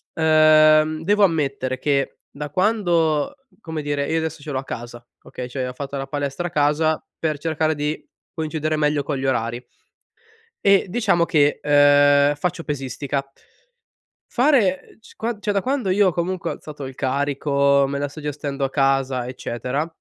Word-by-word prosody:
uhm, 155 0 +5
devo 205 +3 +3
ammettere 140 -6 0
che 140 -2 0
da 145 +1 -7
quando, 175 - +1 0.3
come 160 -2 -5
dire 145 -1 -2
io 165 - +1
adesso 160 -1 -3
ce 145 0 -7
l'ho 130 - -1
a - - -6
casa, 120 0 -8 0.2
okay, 125 - -7
cioè 130 0 -4
ho 125 - -7
fatto 140 +1 -6
la 135 0 -4
palestra 145 +4 -3
a - - -6
casa 155 +1 +1 0.2
per 155 -2 -1
cercare 160 0 -1
di 150 +1 -3 0.3
coincidere 155 -1 -2
meglio 150 -1 +1
con 145 0 -3
gli 130 - -4
orari. 120 -1 -1 1.0
E 195 -1 +5
diciamo 195 -6 +2
che, 150 -3 +2
uhm, 145 0 +5
faccio 170 +2 -3
pesistica. 140 -1 -3 1.1
Fare 240 -8 +2
c - - -18
qua 230 -1 -3
cioè 205 - -1
da 200 - +1
quando 255 -3 -1
io 195 0 +4
comunque 175 +2 -3
ho - - -2
alzato 145 -3 -9
il 130 - -9
carico, 140 +1 +1
me 140 +1 -3
la 145 0 -2
sto 155 +2 -11
gestendo 145 -1 -3
a 135 - -1
casa, 135 -2 +1
eccetera, 125 +4 -3
150 Hz, 165 wpm, -22 LUFS, 140-160 Hz, 1.1 s, uhm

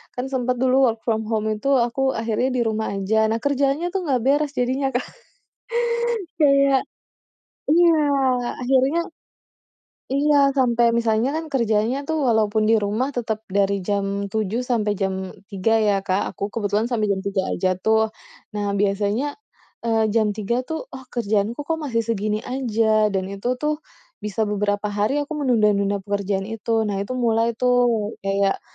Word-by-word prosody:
kan 250 +1 -3
sempet 250 -1 0
dulu 260 -1 +4
work 225 - -10
from 220 -1 +1
home 220 -1 0
itu 275 +6 -3
aku 265 +3 +1
akhirnya 230 +2 -1
di 250 -1 0
rumah 220 -1 -1
aja. 220 +3 +1
Nah, 225 - 0
kerjaannya 285 +4 +1
tuh 385 - 0
nggak 255 -3 +2
beres 290 +1 +2
jadinya 265 +2 0
Kak. 245 - -1 1.3
Kayak 275 -2 +4 0.8
iya, 340 +2 +5 0.7
akhirnya 265 +5 +2 1.2
iya, 290 +1 +3 0.2
sampai 240 -2 +3
misalnya 230 +2 +1
kan 325 - -4
kerjanya 230 0 +1
tuh 320 +1 -1
walaupun 215 -1 +2
di 225 - +5
rumah 215 +6 -1
tetep 220 -2 -2 0.2
dari 200 -1 +2
jam 200 -1 0 0.2
7.00 220 +3 -1
sampai 225 -4 0
jam 190 0 +1 0.4
3.00 200 +3 0
ya 205 -1 +3
Kak 190 +2 +1
aku - - -7
kebetulan 210 0 0
sampai 220 -4 -1
jam 190 -1 0
3.00 195 -1 0
aja 185 +1 0
tuh. 220 0 +2 0.4
Nah, 205 -1 -2
biasanya, 205 +5 +1 0.6
eee, 225 -1 +2
jam 220 -2 +3
3.00 215 +3 -1
tuh, 320 - -2
oh, 260 - -8
kerjaan 215 -3 +1
ku - - -3
kok 325 0 -1
masih 230 -4 0
segini 215 -1 -1 0.2
aja 220 -4 +2
dan 190 -1 -1
itu 200 +5 -5
tuh, 300 0 +1 0.5
bisa 210 +1 -2
beberapa 205 0 -1
hari 210 +6 +1
aku 290 +2 -5
menunda-nunda 210 -5 +2
pekerjaan 200 -1 -1
itu. 225 +1 -9 0.2
Nah, 200 -1 -2
itu 230 +6 -4
mulai 225 0 +2
tuh 250 0 +2 0.5
kayak, 195 0 0
225 Hz, 155 wpm, -22 LUFS, 205-255 Hz, 1.3 s, iya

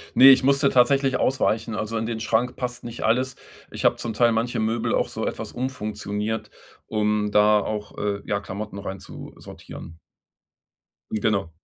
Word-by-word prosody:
Ne, 135 +1 +9
ich 135 -1 +7
musste 140 +1 +3
tatsächlich 135 +1 +3
ausweichen, 115 -4 0
also, 110 +2 -3
in 110 - -2
den 115 -1 -3
Schrank 115 +3 0
passt 125 -1 -5
nicht 120 0 -6
alles. 125 +3 +1 0.4
Ich - - -5
habe - - +5
zum 115 - -4
Teil 120 +2 +3
manche 115 +1 -1
Möbel 110 +1 0
auch - - +1
so - - -4
etwas - - -4
umfunktioniert, 110 -3 -4 0.4
um 105 -1 0
da 105 0 +5
auch, 105 0 -5
äh, 100 -1 -2
ja, 100 - -1
Klamotten 100 +1 -6
rein 95 -1 -6
zu - - -10
sortieren. 80 0 -11 1.1
Genau. 105 -5 0
110 Hz, 165 wpm, -24 LUFS, 105-125 Hz, 1.1 s, Ne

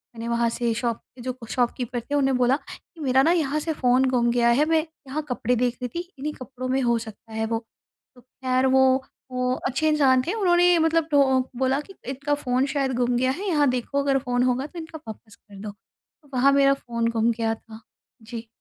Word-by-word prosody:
मैंने 230 0 -6
वहाँ 235 0 +1
से 235 0 -1
शॉप 235 0 -1 0.2
पे 250 - -11
जो 255 +1 -4
शॉपकीपर 245 -1 -1
थे, 285 +5 -4
उन्हें 270 -2 +2
बोला 250 +2 +3
कि, 325 +2 -14
"मेरा 265 -2 +3
ना 330 - +4
यहाँ 305 -4 +1
से 320 +1 -2
फ़ोन 255 -2 +3
गुम 240 -2 +2
गया 235 0 +3
है, 275 +6 +4
मैं 320 0 +3 0.3
यहाँ 285 +4 -2
कपड़े 250 0 0
देख 245 0 0
रही 250 - -1
थी, 340 - -1 0.2
इन्हीं 300 +2 -3
कपड़ों 255 -1 -7
में 265 +1 +1
हो 235 -1 +2
सकता 220 0 -11
है 220 0 -1
वो।" 225 0 -1 0.6
तो 250 - -17
खैर 255 +1 -1
वो 265 0 +6 0.5
वो 250 0 0
अच्छे 310 +5 0
इंसान 270 -4 +4
थे 355 - 0
उन्होंने 355 -4 +4
मतलब 325 0 +2
टो 270 -2 +4 0.2
बोला 265 +2 +1
कि, 390 - -14
"इनका 275 +2 -2
फ़ोन 255 -2 0
शायद 270 -2 0
गुम 245 0 +1
गया 255 +1 +2
है, 385 +9 -4
यहाँ 295 -6 +3
देखो 255 +3 -1
अगर 275 -1 +2
फ़ोन 250 -1 0
होगा 255 +1 +1
तो 340 - -9
इनका 320 -1 -8
वापस 215 -1 -10
कर 205 -2 -18
दो।" 210 - -5
तो 275 +7 -30
वहाँ 260 +2 +4
मेरा 275 0 +5
फ़ोन 235 -3 -2
गुम 230 +1 +3
गया 225 -1 -1
था। 220 0 -14 0.4
जी। 230 +1 -8
255 Hz, 220 wpm, -24 LUFS, 240-285 Hz, 0.6 s, वो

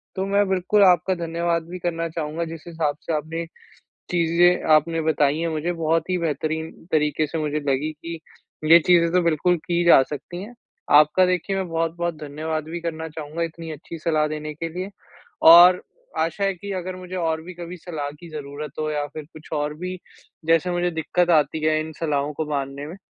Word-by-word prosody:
तो 190 0 -1
मैं 200 +1 +2
बिल्कुल 190 +2 +3
आपका 180 0 +4
धन्यवाद 170 0 -1
भी 180 +1 -6
करना 165 -1 -2
चाहूँगा 160 0 -3
जिस 165 -1 -8
हिसाब 160 -4 -2
से 165 - -3
आपने 160 +2 -3 0.7
चीज़ें 175 +1 +3
आपने 165 +2 +3
बताई 150 -1 +2
हैं 170 - -1
मुझे 160 +2 -2
बहुत 165 0 0
ही 185 - +1
बेहतरीन 160 0 -2 0.2
तरीके 150 0 +1
से 160 - -4
मुझे 150 -1 -1
लगीं 140 +3 0
कि 165 +2 -8 0.5
ये 170 - +10
चीज़ें 170 -2 +5
तो 180 +1 +3
बिल्कुल 170 +2 +2
की 175 -1 +1
जा 170 - +8
सकती 150 +6 -7
हैं। 225 +4 -10 0.5
आपका 155 +5 +4
देखिए 180 +2 -1
मैं 190 -1 -2
बहुत-बहुत 165 +1 -1
धन्यवाद 155 +2 -3
भी 170 +1 -4
करना 160 -1 -4
चाहूँगा 155 +1 -5
इतनी 165 0 -6
अच्छी 155 +2 -8
सलाह 155 -1 +1
देने 155 0 -5
के 165 +2 -5
लिए। 180 +4 -5 0.6
और 180 +2 +9 0.4
आशा 165 +5 -1
है 195 0 +2
कि 200 +3 -7
अगर 185 0 -4
मुझे 185 0 -8
और 160 -3 -1
भी 180 +3 -9
कभी 175 +1 -8
सलाह 160 -4 -5
की 170 - -11
ज़रूरत 150 -1 -7
हो 155 0 -1
या 145 -1 -1
फिर 155 - -6
कुछ 155 0 -13
और 150 0 -1
भी 180 +2 -5 0.5
जैसे 165 +2 +3
मुझे 175 0 0
दिक्कत 175 +2 0
आती 155 -1 +3
है 155 0 +3
इन 160 0 -6
सलाहों 150 -2 -1
को 155 - -3
मानने 140 0 -3
में, 170 - -8
165 Hz, 195 wpm, -23 LUFS, 155-175 Hz, 0.7 s, ये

